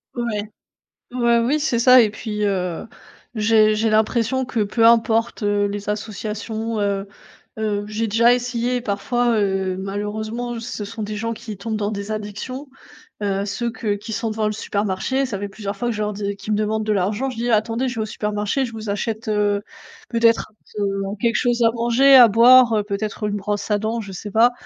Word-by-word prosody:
Ouais. 235 Hz, -4 st, -2 dB, 0.7 s
Bah 235 Hz, -1 st, +2 dB
oui, 290 Hz, +6 st, +1 dB
c'est 255 Hz, -6 st, 0 dB
ça 255 Hz, +1 st, +7 dB
et 215 Hz, -, +3 dB
puis, 210 Hz, -1 st, -4 dB
heu, 180 Hz, -1 st, -2 dB, 0.5 s
j'ai 215 Hz, 0 st, +4 dB
j'ai 220 Hz, +1 st, +1 dB
l'impression 230 Hz, +4 st, +1 dB
que 245 Hz, -3 st, -3 dB
peu 225 Hz, +3 st, +2 dB
importe, 230 Hz, -1 st, +3 dB
heu, 205 Hz, 0 st, +1 dB
les 205 Hz, 0 st, -5 dB
associations, 220 Hz, +1 st, -4 dB
heu, 200 Hz, 0 st, -1 dB, 0.5 s
heu, 205 Hz, -1 st, -1 dB
j'ai 220 Hz, +1 st, -2 dB
déjà 230 Hz, +3 st, +4 dB
essayé 245 Hz, 0 st, -1 dB
parfois, 235 Hz, +2 st, 0 dB
heu, 190 Hz, -2 st, 0 dB
malheureusement, 215 Hz, +4 st, -4 dB
ce 225 Hz, -2 st, -5 dB
sont 220 Hz, +1 st, -6 dB
des 210 Hz, 0 st, -4 dB
gens 230 Hz, +2 st, -2 dB
qui 220 Hz, -3 st, -8 dB
tombent 220 Hz, +1 st, -3 dB
dans 205 Hz, 0 st, -2 dB
des 200 Hz, +1 st, -5 dB
addictions, 215 Hz, +7 st, -5 dB, 0.6 s
heu, 200 Hz, 0 st, -1 dB
ceux 235 Hz, +3 st, -3 dB
que 220 Hz, -2 st, -2 dB
qui 210 Hz, +2 st, -8 dB
sont 225 Hz, 0 st, -2 dB
devant 215 Hz, -1 st, -1 dB
le -, -, 0 dB
supermarché, 210 Hz, +5 st, -1 dB
ça 215 Hz, -7 st, -4 dB
fait 205 Hz, -, -3 dB
plusieurs 200 Hz, 0 st, -6 dB
fois 240 Hz, -, -2 dB
que 230 Hz, -, -2 dB
je 210 Hz, -, -3 dB
leur 210 Hz, 0 st, -1 dB
dis 200 Hz, 0 st, -3 dB
qu'ils 200 Hz, +2 st, -6 dB
me 210 Hz, -, +1 dB
demandent 215 Hz, +1 st, 0 dB
de 215 Hz, -, +1 dB
l'argent. 205 Hz, +7 st, 0 dB
Je 245 Hz, -, -8 dB
dis: 240 Hz, +1 st, -1 dB
«Attendez 225 Hz, +4 st, +1 dB
je 250 Hz, -, -4 dB
vais 220 Hz, -, -2 dB
au -, -, -1 dB
supermarché, 210 Hz, +5 st, -2 dB
je 230 Hz, -, -8 dB
vous 220 Hz, -1 st, -6 dB
achète, 220 Hz, +2 st, -3 dB
heu, 205 Hz, -1 st, +1 dB, 0.5 s
peut-être 230 Hz, -1 st, +2 dB
un -, -, -33 dB
t 210 Hz, -, -9 dB, 0.3 s
un -, -, -5 dB
quelque 235 Hz, +3 st, 0 dB
chose 240 Hz, -1 st, +1 dB
à 225 Hz, -, +5 dB
manger, 240 Hz, +4 st, +4 dB
à 245 Hz, -3 st, +10 dB
boire, 235 Hz, +2 st, +6 dB
heu, 210 Hz, -, +1 dB
peut-être 210 Hz, +1 st, -4 dB
une 205 Hz, -, -2 dB
brosse 205 Hz, +1 st, -3 dB
à 205 Hz, -, +3 dB
dents, 225 Hz, +2 st, -2 dB
je 200 Hz, -2 st, -9 dB
sais 200 Hz, +3 st, -7 dB
pas». 230 Hz, +4 st, +5 dB
220 Hz, 205 wpm, -21 LUFS, 205-235 Hz, 0.7 s, à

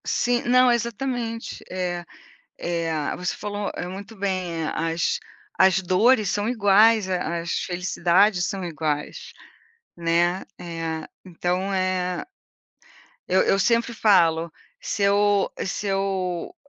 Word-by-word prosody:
Sim, 245 Hz, 0 st, +1 dB
não, 250 Hz, +1 st, +5 dB
exatamente. 235 Hz, 0 st, -3 dB
Eh 180 Hz, -1 st, -3 dB, 0.6 s
eh, 165 Hz, -3 st, -2 dB
você 180 Hz, -1 st, -2 dB
falou 205 Hz, -1 st, -4 dB, 0.2 s
muito 200 Hz, +4 st, -9 dB
bem. 185 Hz, -4 st, -2 dB
Eh, -, -, -1 dB, 0.2 s
as 165 Hz, -, 0 dB, 0.4 s
as 190 Hz, 0 st, +5 dB
dores 205 Hz, +4 st, +3 dB
são 205 Hz, +1 st, -1 dB
iguais. 215 Hz, -2 st, +4 dB
A 175 Hz, -2 st, -1 dB
as 170 Hz, +1 st, -4 dB
felicidades 180 Hz, +1 st, +2 dB
são 195 Hz, -2 st, -4 dB
iguais, 155 Hz, -3 st, -3 dB, 0.6 s
né. 170 Hz, +2 st, +1 dB, 0.2 s
Eh, 165 Hz, -2 st, -5 dB, 0.2 s
então, 180 Hz, +2 st, -2 dB
eh, 185 Hz, -1 st, -1 dB, 1.0 s
eu 190 Hz, -, +3 dB
eu 195 Hz, -, +2 dB
sempre 230 Hz, +3 st, +2 dB
falo: 170 Hz, -7 st, +3 dB, 0.3 s
“Se 355 Hz, -, -2 dB
eu 200 Hz, 0 st, +3 dB
se 195 Hz, +2 st, -4 dB
eu 195 Hz, -, -2 dB
190 Hz, 115 wpm, -24 LUFS, 175-210 Hz, 1.0 s, não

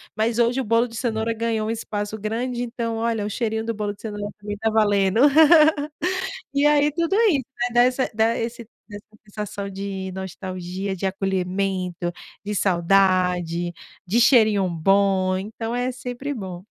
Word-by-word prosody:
mas 225 Hz, +2 st, 0 dB
hoje 240 Hz, +3 st, +2 dB
o -, -, -3 dB
bolo 230 Hz, +2 st, +2 dB
de 230 Hz, -, -12 dB
cenoura 225 Hz, -1 st, -1 dB
ganhou 225 Hz, -1 st, -1 dB
um -, -, -1 dB
espaço 215 Hz, -1 st, -4 dB
grande, 240 Hz, +3 st, -2 dB
então 230 Hz, -1 st, -3 dB
olha, 225 Hz, -2 st, -1 dB
o 210 Hz, -, -3 dB
cheirinho 220 Hz, 0 st, -2 dB
do 230 Hz, -, -1 dB
bolo 205 Hz, -1 st, -3 dB
de -, -, -21 dB
cenoura 205 Hz, -2 st, -5 dB
também 205 Hz, 0 st, -5 dB
tá 220 Hz, +1 st, 0 dB
valendo. 205 Hz, 0 st, +3 dB, 1.3 s
E 285 Hz, +1 st, +3 dB
aí, 295 Hz, 0 st, +4 dB
tudo 335 Hz, +3 st, 0 dB, 0.2 s
isso, 275 Hz, -6 st, 0 dB, 0.3 s
dá 240 Hz, -, +6 dB
essa 255 Hz, +1 st, 0 dB
dá 225 Hz, +2 st, +2 dB
esse 235 Hz, +1 st, -4 dB, 0.2 s
da 205 Hz, -, -8 dB
essa 205 Hz, -, -12 dB, 0.2 s
sensação 205 Hz, -1 st, -6 dB
de 195 Hz, -1 st, -5 dB
nostalgia, 190 Hz, 0 st, -5 dB
de 195 Hz, -, -2 dB
acolhimento, 185 Hz, -2 st, -2 dB, 0.3 s
de 210 Hz, 0 st, -3 dB
saudade, 180 Hz, -2 st, +2 dB, 0.3 s
de 225 Hz, +7 st, +2 dB
cheirinho 215 Hz, -6 st, +4 dB
bom. 190 Hz, +2 st, +2 dB
Então, 225 Hz, +4 st, -5 dB
é 250 Hz, +1 st, -1 dB
sempre 250 Hz, +3 st, -5 dB
bom. 185 Hz, -5 st, -7 dB
210 Hz, 160 wpm, -23 LUFS, 190-230 Hz, 1.3 s, dá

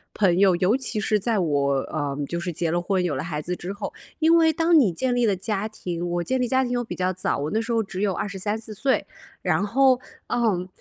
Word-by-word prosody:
朋 185 Hz, -3 st, +3 dB
友， 190 Hz, -3 st, +5 dB
尤 185 Hz, +6 st, +2 dB
其 255 Hz, -5 st, -2 dB
是 210 Hz, +1 st, +1 dB
在 225 Hz, +1 st, 0 dB
我， 145 Hz, -5 st, +1 dB
呃， 145 Hz, -2 st, -3 dB
就 170 Hz, -, -3 dB
是 175 Hz, 0 st, -3 dB
结 165 Hz, 0 st, -1 dB
了 175 Hz, 0 st, +1 dB
婚、 185 Hz, 0 st, 0 dB
有 170 Hz, -5 st, 0 dB
了 130 Hz, -, -3 dB
孩 155 Hz, -3 st, -3 dB
子 180 Hz, +3 st, -3 dB
之 180 Hz, +2 st, -6 dB
后。 200 Hz, -, -5 dB, 0.2 s
因 325 Hz, +1 st, +4 dB
为 320 Hz, -1 st, +5 dB
当 325 Hz, +1 st, +4 dB
你 210 Hz, -9 st, +3 dB
建 245 Hz, +8 st, -1 dB
立 240 Hz, -2 st, +2 dB
了 200 Hz, -, +2 dB
家 210 Hz, +2 st, -2 dB
庭 175 Hz, -5 st, -5 dB
我 175 Hz, 0 st, -1 dB
建 260 Hz, +4 st, 0 dB
立 245 Hz, -, +1 dB
家 260 Hz, +2 st, +2 dB
庭 245 Hz, -, -3 dB
又 245 Hz, 0 st, 0 dB
比 -, -, -6 dB
较 185 Hz, 0 st, 0 dB
早， 185 Hz, -, -1 dB
我 145 Hz, +2 st, -3 dB
那 220 Hz, +1 st, +1 dB
时 230 Hz, +1 st, -4 dB
候， 225 Hz, -1 st, +2 dB
只 195 Hz, 0 st, -6 dB
有 205 Hz, -2 st, +2 dB
23，24 210 Hz, +3 st, -3 dB
岁， 265 Hz, +6 st, 0 dB, 0.4 s
然 175 Hz, -1 st, +2 dB
后， 255 Hz, +4 st, +4 dB, 0.3 s
嗯， 200 Hz, -7 st, +1 dB
200 Hz, 260 characters per minute, -24 LUFS, 175-240 Hz, 0.4 s, 友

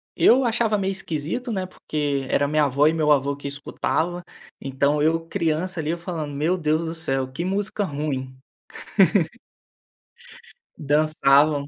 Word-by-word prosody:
eu 260 Hz, +2 st, +5 dB
achava 225 Hz, -2 st, +1 dB
meio 195 Hz, -1 st, -1 dB
esquisito, 190 Hz, -, -3 dB
né, 190 Hz, -3 st, -2 dB
porque 145 Hz, -6 st, -3 dB
era 145 Hz, -, +2 dB
a -, -, -1 dB
minha 150 Hz, 0 st, +2 dB
avó 140 Hz, +2 st, +3 dB
e 160 Hz, -, +3 dB
meu 155 Hz, -2 st, +2 dB
avô 140 Hz, 0 st, +2 dB
que 145 Hz, -, -7 dB
escutava, 160 Hz, +5 st, -2 dB, 0.4 s
então, 140 Hz, +2 st, 0 dB
eu 165 Hz, +2 st, +1 dB
criança 165 Hz, +3 st, -1 dB
ali, 155 Hz, -1 st, -2 dB
eu 170 Hz, -, -2 dB
falando: 165 Hz, -4 st, -5 dB
"Meu 165 Hz, +6 st, +1 dB
Deus 155 Hz, -1 st, 0 dB
do 160 Hz, -, -4 dB
céu 135 Hz, -5 st, -2 dB
que 160 Hz, +6 st, -4 dB
música 205 Hz, +2 st, -1 dB
ruim". 140 Hz, -5 st, -4 dB, 2.4 s
Dançavam, 145 Hz, -1 st, +3 dB
155 Hz, 150 wpm, -23 LUFS, 145-175 Hz, 2.4 s, eu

